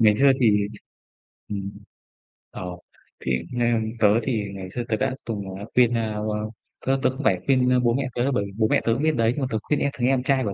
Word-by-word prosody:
Ngày 105 -2 +6
xưa 135 +5 +5
thì 115 -4 +5 1.0
ừm, 100 -1 -4 0.8
ồ, 90 -1 -7 0.4
thì 65 - -3 0.2
ng 120 -2 +1
tớ 105 - +6 0.2
thì 115 -4 0
ngày 95 -1 -7
xưa 120 +5 -4
tớ 110 - +2
đã 130 +1 0
từng, 110 -3 -3 0.2
ờ, 100 - -6
khuyên, 120 -1 +5
ơ, 110 -2 -1
ơ, 105 0 -2 0.4
tớ 135 +1 +2
tớ - - +5
không 130 +3 -6
phải 95 -6 +3
khuyên, 130 -2 +3
ơ, 125 0 +4
bố 120 -1 +2
mẹ 135 +1 0
tớ 120 - +1
đâu, 140 - +1
bởi 100 -5 0
vì 100 - -8
bố 110 -1 +3
mẹ - - +3
tớ 115 - +3
cũng 130 +6 -2
biết 155 0 +2
đấy, 115 -1 +3
nhưng 145 - -4
mà 130 - 0
tớ 110 - +1
khuyên 150 - 0
em 140 - +1
thằng 125 -1 0
em 130 -1 +2
trai 135 -1 +2
của 100 -3 -2
120 Hz, 255 wpm, -24 LUFS, 105-130 Hz, 1.0 s, Ngày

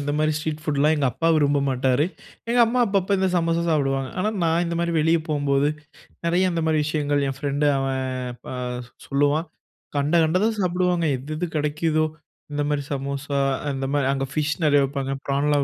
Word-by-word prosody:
இந்த 145 0 -2
மாதிரி 155 0 +2
ஸ்ட்ரீட் 155 0 -3
ஃபுட்லாம் 150 0 +2
எங்க 140 -2 +1
அப்பா 165 +7 0
விரும்ப 145 -1 +3
மாட்டாரு. 130 +2 +2 0.4
எங்க 240 +1 +3
அம்மா 245 +2 +1
அப்பப்ப 200 -1 +1
இந்த 190 0 +2
சமோசா 165 0 +1
சாப்டுவாங்க. 135 -3 0
ஆனா 210 +4 +1
நான் 165 +1 +2
இந்த 170 0 -2
மாதிரி 170 0 0
வெளிய 160 +2 +3
போம்போது 145 -1 +1 0.6
நிறைய 180 +2 +2
இந்த 170 -1 -1
மாதிரி 155 -1 +2
விஷயங்கள் 145 -1 0
என் 135 0 -4
ஃப்ரெண்டு 145 +1 0
அவன் 135 -1 -1 0.5
அ - - -4 0.5
சொல்லுவான். 145 +4 +1 0.5
கண்ட 145 +4 +1
கண்டதும் 190 +8 +1
சாப்பிடுவாங்க. 180 -1 +1
எது 140 +5 -7
எது 180 - -1
கிடைக்குதோ 155 +1 +1 0.5
இந்த 145 - -1
மாதிரி 145 -1 0
சமோசா 140 +1 -3 0.3
அந்த 135 -1 -3
மாதிரி 145 -2 +2
அங்க 135 0 -1
ஃபிஷ் 150 0 0
நிறைய 145 -2 +5
விப்பாங்க 135 0 -3
பிரான்லாம் 140 +1 +2
150 Hz, 175 wpm, -23 LUFS, 140-165 Hz, 0.6 s, நிறைய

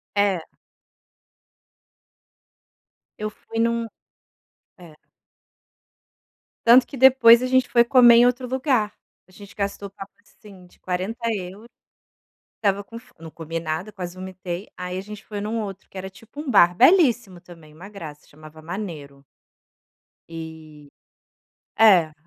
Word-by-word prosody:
É. 200 -5 0 2.7
Eu 215 0 -4
fui 225 +1 -11
em 230 0 +3
um 235 0 -2 0.9
É. 175 -4 -15 1.7
Tanto 240 +2 +7
que - - -11
depois 250 -3 +6
a 255 - -1
gente 260 0 +2
foi 235 - +4
comer 240 -1 +6
em 240 - +6
outro 250 +1 -2
lugar, 255 -5 0 0.3
a - - -23
gente 200 +1 -15
gastou 200 0 -4
papo 195 0 -11
assim 200 -3 -18
de - - -26
40 190 +6 -4
euros, 195 +2 -7 0.9
estava 200 -1 0
com 230 +3 -11
fo 250 - -21
não 165 -1 -10
comi 165 +1 -6
nada, 165 +6 -5
quase 180 -2 -8
vomitei, 185 0 -7
aí 180 0 -5
a - - -3
gente 210 +1 -11
foi 210 - -7
em 205 - -4
um 225 +1 -2
outro 195 -1 -9
que - - -17
era 190 0 -6
tipo 225 +9 -13
um 300 -3 -5
bar 175 -6 +5
belíssimo 245 - +3
também, 165 -3 -16
uma 170 +6 -12
graça, 160 -8 -11
chamava 155 +1 -15
Manero. 155 -6 -8 1.1
E 160 -3 -11 0.9
é, 185 -8 +5
200 Hz, 140 wpm, -22 LUFS, 175-230 Hz, 2.7 s, Tanto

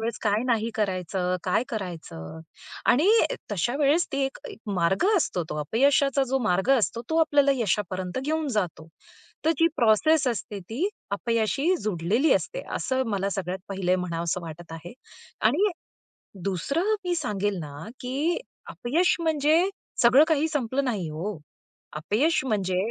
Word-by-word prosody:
वेळेस 225 0 -3
काय 210 +1 +2
नाही 230 -1 +1
करायचं, 185 -3 -1
काय 185 +5 +2
करायचं. 165 - -6 0.5
आणि 305 +11 +4 0.4
तशा 205 - 0
वेळेस 300 +4 +3
तो - - -1
एक 270 -1 -1
एक - - -10 0.2
मार्ग 180 - +2
असतो, 185 - 0
तो - - -3
अपयशाचा 275 - +3
जो 270 +1 +1
मार्ग 190 +6 +1
असतो, 230 +2 -1
तो 320 - +1
आपल्याला 290 -3 +4
यशापर्यंत 190 -5 -1
घेऊन 310 +1 -1
जातो. 170 -6 -2 0.6
तर 320 - +4
जी 330 - +5
प्रोसेस 275 +7 +4
असते, 210 -3 -4
ती 240 - -2 0.2
अपयशाशी 230 - +1
जुडलेली 215 - +2
असते, - - -2
असं 260 0 0
मला 200 0 -1
सगळ्यात 190 -1 -3
पहिलं 185 -2 0
म्हणावंसं 170 0 -2
वाटत 165 +1 -9
आहे. 165 +2 -8 0.5
आणि 335 - +3 0.7
दुसरं 280 - 0
मी 355 - 0
सांगेल 205 - -1
ना, 150 +4 -8
की 285 +7 -1 0.3
अपयश 330 +9 +1
म्हणजे 320 +3 +3 0.3
सगळं 255 +5 +7
काही 315 -1 +2
संपलं 275 -2 -1
नाही 210 -9 -1
हो, 170 +5 -4 0.6
अपयश 240 - +1
म्हणजे 190 -6 0
220 Hz, 140 wpm, -26 LUFS, 185-285 Hz, 0.7 s, सगळं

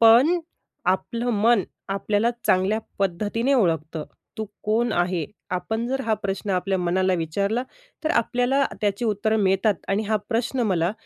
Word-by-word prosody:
पण 240 +10 +7 0.5
आपलं 235 +6 0
मन 230 -3 +5 0.3
आपल्याला 205 +3 +1 0.2
चांगल्या 190 +4 +3 0.2
पद्धतीने 210 +8 +1
ओळखतं. 160 - +1 0.3
तू 220 - -1 0.2
कोण 225 +2 +1
आहे, 175 -2 +1 0.3
आपण 220 +6 -2
जर 265 +1 -1
हा 225 - +2
प्रश्न 200 0 -3
आपल्या 190 +1 +1
मनाला 185 +1 +2
विचारला, 200 +8 0 0.4
तर 310 - +2
आपल्याला 245 +4 +2 0.2
त्याची 205 +2 0
उत्तरं 220 +1 +1
मिळतात 195 +2 +3
आणि 200 +2 +1
हा 215 +1 +1
प्रश्न 245 +2 0
मला 175 -1 +1
205 Hz, 140 wpm, -24 LUFS, 185-230 Hz, 0.5 s, पण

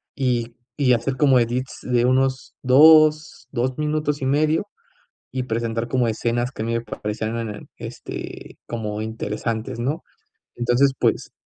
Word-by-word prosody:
y 120 -3 -1 0.2
y 130 -3 +4
hacer 125 +3 -1
como 135 -3 +5
edits 125 +3 -2
de 120 -1 +2
unos 130 +1 +1
2, 155 +3 +5
2 130 0 -1
minutos 150 -1 -1
y - - -1
medio, 155 +7 +2 0.6
y 130 -1 -2
presentar 115 -1 -2
como 125 -1 +1
escenas 120 +3 -1
que 120 - -7
a - - -3
mí 115 - -1
me 115 - 0
parecían 110 0 -4
en 115 -1 -3
el 105 0 -8
este, - - -8
como 105 -2 -4
interesantes, 110 +2 -3
¿no? 145 +8 -2 0.5
Entonces, 120 +3 +3
pues, - - 0
125 Hz, 150 wpm, -22 LUFS, 115-135 Hz, 0.6 s, como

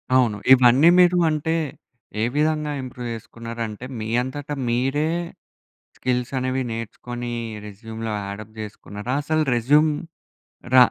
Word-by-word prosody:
అవును. 120 -5 +3 0.2
ఇవన్నీ 130 +5 +7
మీరు 180 0 +6
అంటే, 155 +2 0 0.7
ఏ - - +2
విధంగా 150 0 +1
ఇంప్రూవ్ 125 -1 -6
చేసుకున్నారంటే 115 0 -6
మీ 110 - -4
అంతట 140 +3 -6 0.2
మీరే 135 +6 +1 0.9
స్కిల్స్ 125 0 -1
అనేవి 130 +1 0
నేర్చుకొని 120 +2 -5 0.3
రెస్యూమ్‌లో 110 +2 -6 0.2
అడ్ 100 +1 -6
అప్ 110 - -23
చేసుకున్నారా? 105 +2 -6
అసలు 155 +1 +1
రెస్యూమ్ 150 +6 +4 0.8
ర - - +8
125 Hz, 115 wpm, -23 LUFS, 115-145 Hz, 0.9 s, ర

